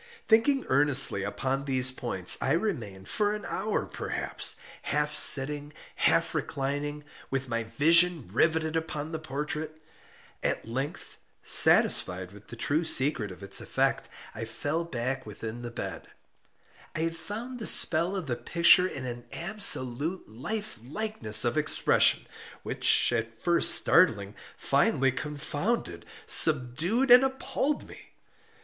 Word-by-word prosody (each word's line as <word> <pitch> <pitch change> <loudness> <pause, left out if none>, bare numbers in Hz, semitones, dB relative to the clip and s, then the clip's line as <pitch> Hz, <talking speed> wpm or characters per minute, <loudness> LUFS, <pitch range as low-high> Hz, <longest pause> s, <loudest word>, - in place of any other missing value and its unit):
Thinking 255 +5 +2
earnestly 135 -6 +3
upon 130 +8 -4
these 130 -2 0
points, 105 -8 +2
I 135 - 0
remained, 120 - -4
for 210 0 -2
an 210 - -9
hour 215 0 -3
perhaps, - - -1 0.3
half 150 +1 -3
sitting, 145 +2 +4 0.2
half - - +1
reclining, 145 +2 -5 0.3
with 135 -1 -4
my 115 -1 -3
vision 165 - +3
riveted 160 +4 0
upon 160 -1 -5
the 160 - -5
portrait. 155 +1 -6 0.6
At - - -3
length, 135 +5 -7 0.2
satisfied 90 0 +5
with 105 +1 -17
the - - -11
true 145 +7 -2
secret 135 -7 +3
of 95 +1 -13
its 100 0 -3
effect, - - -2 0.2
I - - -7
fell 145 +8 -4
back 130 -2 -5
within 110 +3 -8
the 120 - -7
bed. 120 - -8 0.9
I 160 - -3
had 165 0 -3
found 230 +9 -8
the 220 - -3
spell 170 +4 +3
of 185 -4 -5
the 125 -4 -3
picture 170 +8 +3
in 135 -7 -8
an 120 -1 -8
absolute 170 - -1
life 135 - -7
likeliness 125 - +2
of 120 +6 0
expression, 150 - +2 0.4
which, - - +1
at 115 0 -5
first 170 -1 +5
startling, 105 - +2 0.2
finally 135 0 0
confounded, 150 - -5 0.2
subdued, 160 - +2
and 250 +1 +8
appalled 270 +2 -3
me. - - -15
145 Hz, 130 wpm, -26 LUFS, 120-170 Hz, 0.9 s, and